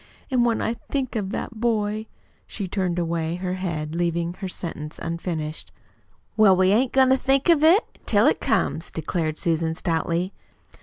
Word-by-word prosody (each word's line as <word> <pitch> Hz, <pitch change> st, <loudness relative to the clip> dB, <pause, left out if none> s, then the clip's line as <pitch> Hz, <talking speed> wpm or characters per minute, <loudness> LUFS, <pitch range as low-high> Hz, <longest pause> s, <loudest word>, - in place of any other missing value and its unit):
"And 250 Hz, -2 st, +3 dB
when 235 Hz, -1 st, +1 dB
I 225 Hz, -, 0 dB
think 255 Hz, +2 st, -4 dB
of 205 Hz, -4 st, -2 dB
that 220 Hz, +2 st, -5 dB
boy 215 Hz, -2 st, 0 dB, 0.2 s
" -, -, -37 dB
She 200 Hz, -3 st, -5 dB
turned 180 Hz, -2 st, -1 dB
away 165 Hz, -1 st, -1 dB
her 180 Hz, 0 st, -3 dB
head, 165 Hz, -5 st, -3 dB
leaving 170 Hz, 0 st, -1 dB
her 190 Hz, +1 st, -6 dB
sentence 160 Hz, -4 st, -6 dB
unfinished. 165 Hz, -2 st, -4 dB, 0.6 s
"Well, 210 Hz, -4 st, +6 dB
we 185 Hz, +1 st, +3 dB
ain't 245 Hz, +5 st, +3 dB
goin' 265 Hz, -1 st, +5 dB
to 265 Hz, -, +5 dB
think 270 Hz, +4 st, +2 dB
of 320 Hz, -3 st, +5 dB
it 350 Hz, +8 st, +4 dB
till -, -, +4 dB
it -, -, +3 dB
comes" 165 Hz, -, 0 dB
declared 160 Hz, 0 st, -2 dB
Susan 165 Hz, -1 st, 0 dB
stoutly. 170 Hz, +2 st, -1 dB
185 Hz, 170 wpm, -24 LUFS, 165-225 Hz, 0.6 s, Well